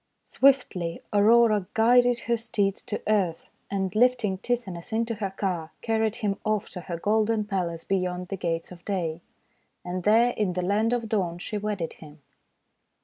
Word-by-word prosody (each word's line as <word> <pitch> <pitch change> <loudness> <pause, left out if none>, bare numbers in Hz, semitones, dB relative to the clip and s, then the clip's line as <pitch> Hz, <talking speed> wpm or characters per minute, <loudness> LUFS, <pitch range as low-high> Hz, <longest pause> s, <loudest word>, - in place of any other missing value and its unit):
Swiftly 245 -11 +2
Aurora 215 -1 +4
guided 245 +1 +4
her 235 - 0
steeds 205 -4 -1
to 215 -4 -5
earth, 190 -6 +1 0.2
and 195 0 -2
lifting 230 -5 +2
Tithonus 200 -5 -3
into 230 +1 0
her 205 -3 -3
car 185 -4 -3
carried 220 -1 +1
him 205 -4 -1
off 215 -1 -1
to 180 - -7
her 175 -1 -5
golden 215 +3 +1
palace 175 -5 -2
beyond 180 -1 -2
the 195 - -2
Gates 165 -2 -3
of 175 -1 -12
Day. 175 -5 -2 0.6
And 180 +1 -3
there 225 +5 +4
in 210 -6 -1
the 180 0 -2
Land 210 +5 +1
of 240 -2 -1
Dawn 185 -6 -1
she 205 +4 -4
wedded 205 -5 -3
him. 155 -1 -13
205 Hz, 160 wpm, -26 LUFS, 180-225 Hz, 0.6 s, Aurora